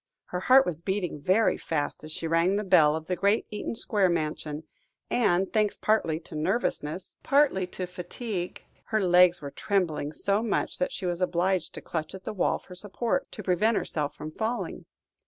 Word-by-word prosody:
Her 180 - -2
heart 260 +7 +6
was 165 -2 -3
beating 180 -5 -2
very 190 +8 +3
fast 150 -2 -2
as 155 - -8
she 165 - -4
rang 165 +4 +2
the 210 - 0
bell 155 -6 +5
of 160 0 -5
the 180 - -1
great 200 +4 +2
Eaton 210 +2 -4
Square 205 -4 +2
mansion, 155 -2 -2 0.5
and, 190 -5 +2
thanks 215 -2 +2
partly 165 -8 +1
to - - -13
nervousness, 175 0 -2
partly 275 - +3
to 185 0 -4
fatigue, 180 +1 -5 0.2
her 220 - 0
legs 180 -2 +5
were 140 - -5
trembling 170 -7 -1
so 200 +6 0
much, 225 -3 -1
that 180 - 0
she - - -4
was 175 0 -1
obliged 180 0 0
to - - -5
clutch 160 +2 -4
at 190 - -10
the - - -4
wall 190 - +1
for 180 - -14
support, 205 +5 -2
to 215 - -7
prevent 205 +5 +2
herself 150 -2 -2
from 155 +1 -7
falling. 225 +8 -3
180 Hz, 185 wpm, -27 LUFS, 165-210 Hz, 0.5 s, heart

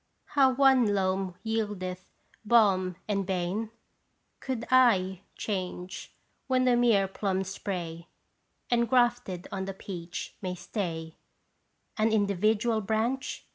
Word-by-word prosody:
How 265 -3 +4
one 260 -6 +5
loam 190 -1 0
yieldeth 205 -5 -3 0.4
balm 195 -5 +3
and 200 -2 0
bane? 190 +3 -2 0.7
Could 255 -3 -3 0.3
/ 185 0 -8
change 185 -2 -5 0.3
when 255 -1 +2
the 250 -1 +4
mere 230 -5 +4
plum 190 -1 -1
spray 175 -3 -5 0.6
Engrafted 240 -5 +2
on 190 -1 -3
the 195 0 -5
peach 175 -3 -7
may 185 -2 -3
stay 165 -4 -4 0.8
An 220 +1 +3
individual 215 +2 +2
branch? 225 +6 -2
200 Hz, 105 wpm, -28 LUFS, 185-230 Hz, 0.8 s, one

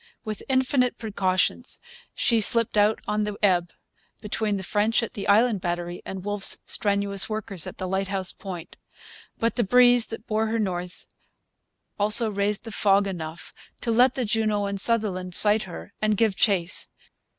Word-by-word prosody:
With 215 -1 -5
infinite 260 -1 +1
precautions 200 +2 -1 0.4
she 230 -2 +1
slipped 230 +1 +3
out 210 +1 +2
on 210 0 0
the 210 -1 -4
ebb, 175 -4 +2 0.5
between 210 -1 -2
the 190 - -6
French 215 +5 0
at 230 - -6
the 205 -4 -6
Island 215 0 +3
Battery 175 0 -4
and 190 0 -7
Wolfe's 205 -1 +5
strenuous 200 -1 +1
workers 210 -5 -3
at - - -9
the 185 - -4
Lighthouse 190 0 -2
Point. 180 -3 -9 0.6
But 230 +1 -1
the 240 - +2
breeze 245 +2 +5
that 225 0 -8
bore 220 +1 -1
her 225 +1 -1
north 180 -4 -4 0.9
also 215 +2 +4
raised 200 +1 -1
the 225 - -8
fog 200 -1 +2
enough 170 -4 -7 0.3
to 230 - -1
let 250 +3 +3
the 255 - -2
Juno 215 -2 0
and 200 -1 -2
Sutherland 195 -5 0
sight 210 0 +3
her 185 +2 -10
and 215 -1 +1
give 220 -3 +1
chase. 185 -5 +1
205 Hz, 160 wpm, -24 LUFS, 190-225 Hz, 0.9 s, Wolfe's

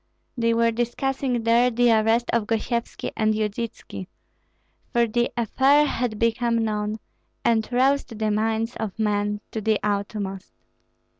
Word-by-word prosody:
They 230 -2 +1
were 230 0 +3
discussing 245 +1 -1
there 235 +2 +4
the 240 0 +3
arrest 225 +2 +2
of 230 -3 +1
Gosyevski 235 +1 -2
and 215 0 +1
Yudytski; 215 -3 -4 0.8
for 235 -1 +3
the 240 +2 0
affair 270 +6 +4
had 240 -6 -2
become 230 +1 +1
known, 210 0 -2 0.5
and 225 -1 +2
roused 260 -1 +1
the 215 0 0
minds 220 +2 0
of 215 -4 -4
men 210 -1 0
to 220 - -3
the 215 0 +1
utmost. 200 -1 -3
225 Hz, 135 wpm, -24 LUFS, 215-240 Hz, 0.8 s, there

